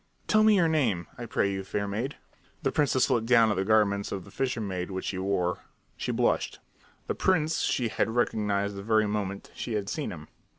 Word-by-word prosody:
"Tell 215 Hz, 0 st, +4 dB
me 215 Hz, -1 st, +6 dB
your 175 Hz, -4 st, +4 dB
name, 120 Hz, -, +1 dB
I 120 Hz, -, -5 dB
pray 100 Hz, -2 st, +1 dB
you, 95 Hz, 0 st, -3 dB
fair 100 Hz, +1 st, -2 dB
maid." 115 Hz, +8 st, -3 dB, 0.5 s
The 135 Hz, -, +1 dB
princess 140 Hz, -3 st, +2 dB
looked 115 Hz, -3 st, +1 dB
down 115 Hz, -3 st, +5 dB
at -, -, 0 dB
the 95 Hz, -, 0 dB
garments 100 Hz, -1 st, +2 dB
of 95 Hz, -2 st, -4 dB
the -, -, -14 dB
fisher 130 Hz, -3 st, -1 dB
maid 95 Hz, -4 st, -3 dB
which 95 Hz, -1 st, -4 dB
she 95 Hz, -, -3 dB
wore. 95 Hz, -2 st, 0 dB, 0.4 s
She -, -, -3 dB
blushed. -, -, +1 dB, 0.5 s
The -, -, -1 dB
prince 160 Hz, -4 st, +1 dB
she 125 Hz, -, +1 dB
had -, -, 0 dB
recognized 105 Hz, -3 st, 0 dB
the 100 Hz, -, -6 dB
very 110 Hz, +1 st, +3 dB
moment 100 Hz, -2 st, -3 dB
she 120 Hz, -, -5 dB
had 105 Hz, -2 st, -2 dB
seen 150 Hz, -, -3 dB
him. 75 Hz, -3 st, -9 dB
105 Hz, 210 wpm, -28 LUFS, 100-125 Hz, 0.5 s, me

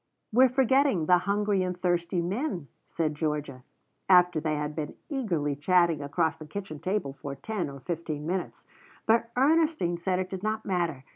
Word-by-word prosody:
"We're 255 Hz, +3 st, +6 dB
forgetting 265 Hz, -, +3 dB
the 180 Hz, +2 st, +5 dB
hungry 205 Hz, -1 st, +2 dB
and 180 Hz, -1 st, -2 dB
thirsty 175 Hz, 0 st, 0 dB
men," 185 Hz, -, -3 dB, 0.2 s
said 155 Hz, -2 st, -1 dB
Georgia, 150 Hz, -4 st, -3 dB, 0.5 s
after 180 Hz, -3 st, +6 dB
they 155 Hz, 0 st, -1 dB
had 150 Hz, 0 st, -3 dB
been 155 Hz, -2 st, -4 dB
eagerly 175 Hz, -, -1 dB
chatting 170 Hz, +1 st, +3 dB
across 155 Hz, +3 st, 0 dB
the 155 Hz, -, -10 dB
kitchen 155 Hz, -2 st, -6 dB
table 185 Hz, -4 st, -2 dB
for 140 Hz, 0 st, -7 dB
ten 210 Hz, -2 st, -3 dB
or 140 Hz, -1 st, -10 dB
fifteen 155 Hz, -1 st, -4 dB
minutes. 180 Hz, +2 st, -3 dB, 0.4 s
But 230 Hz, +1 st, +3 dB
Ernestine 300 Hz, -, +2 dB
said 185 Hz, +1 st, 0 dB
it 185 Hz, 0 st, -3 dB
did 190 Hz, -1 st, -4 dB
not 215 Hz, +1 st, -2 dB
matter. 170 Hz, -8 st, -1 dB
175 Hz, 165 wpm, -28 LUFS, 155-205 Hz, 0.5 s, We're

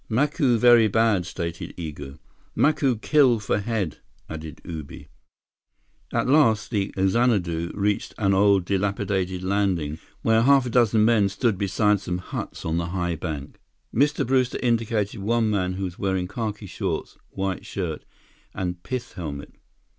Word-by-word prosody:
"Macu 135 Hz, +1 st, +2 dB
very 120 Hz, -1 st, +6 dB
bad," 105 Hz, -4 st, +2 dB
stated 85 Hz, -1 st, -5 dB
Igo. 75 Hz, -4 st, -7 dB, 0.4 s
"Macu 140 Hz, -6 st, +2 dB
kill 130 Hz, -4 st, +4 dB
for 105 Hz, 0 st, -1 dB
head," 100 Hz, -6 st, -2 dB, 0.3 s
added 80 Hz, -1 st, -8 dB
Ubi. 80 Hz, -4 st, -8 dB, 1.0 s
At -, -, 0 dB
last 125 Hz, -8 st, +3 dB
the 100 Hz, -3 st, -1 dB
Xanadu 95 Hz, -5 st, +1 dB
reached 105 Hz, 0 st, -1 dB
an 100 Hz, -2 st, +2 dB
old, 100 Hz, -1 st, +4 dB
dilapidated 95 Hz, -1 st, -1 dB
landing, 95 Hz, -6 st, 0 dB, 0.2 s
where 110 Hz, 0 st, +4 dB
half 135 Hz, +1 st, +5 dB
a 120 Hz, -, -3 dB
dozen 115 Hz, -3 st, +4 dB
men 110 Hz, -4 st, +4 dB
stood 105 Hz, -1 st, 0 dB
beside 105 Hz, +1 st, +2 dB
some 90 Hz, -2 st, -3 dB
huts 90 Hz, -, -6 dB
on 80 Hz, 0 st, 0 dB
the 85 Hz, -1 st, -1 dB
high 90 Hz, -1 st, -2 dB
bank. 75 Hz, -4 st, -6 dB, 0.3 s
Mr. 145 Hz, +5 st, +2 dB
Brewster 130 Hz, 0 st, +1 dB
indicated 115 Hz, -3 st, 0 dB
one 110 Hz, +1 st, +1 dB
man 90 Hz, -3 st, 0 dB
who 95 Hz, +1 st, -4 dB
was 90 Hz, -2 st, -5 dB
wearing 95 Hz, -2 st, -1 dB
khaki 105 Hz, -1 st, -4 dB
shorts, 95 Hz, -, -4 dB
white 95 Hz, -1 st, -3 dB
shirt, 85 Hz, -6 st, -4 dB, 0.5 s
and 90 Hz, -1 st, -3 dB
pith 125 Hz, +3 st, -5 dB
helmet. 75 Hz, -5 st, -7 dB
100 Hz, 145 wpm, -24 LUFS, 90-115 Hz, 1.0 s, very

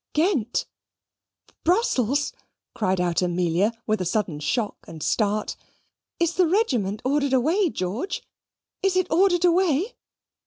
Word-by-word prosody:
"Ghent! 300 Hz, -, +1 dB, 1.0 s
Brussels!" 290 Hz, -, +1 dB, 0.4 s
cried 190 Hz, -4 st, 0 dB
out 175 Hz, -1 st, +1 dB
Amelia 180 Hz, +3 st, +1 dB
with 215 Hz, -2 st, 0 dB
a -, -, -1 dB
sudden 175 Hz, -5 st, -1 dB
shock 210 Hz, -, -1 dB
and 160 Hz, -2 st, -8 dB
start. 210 Hz, -1 st, 0 dB, 0.6 s
"Is 340 Hz, 0 st, +2 dB
the 365 Hz, -1 st, +3 dB
regiment 250 Hz, -, 0 dB
ordered 280 Hz, 0 st, +1 dB
away, 325 Hz, -, +3 dB
George 210 Hz, -, -3 dB, 0.6 s
is 390 Hz, -1 st, +1 dB
it 370 Hz, -1 st, +3 dB
ordered 355 Hz, +1 st, +4 dB
away?" 355 Hz, -, +2 dB
260 Hz, 120 wpm, -24 LUFS, -, 1.0 s, ordered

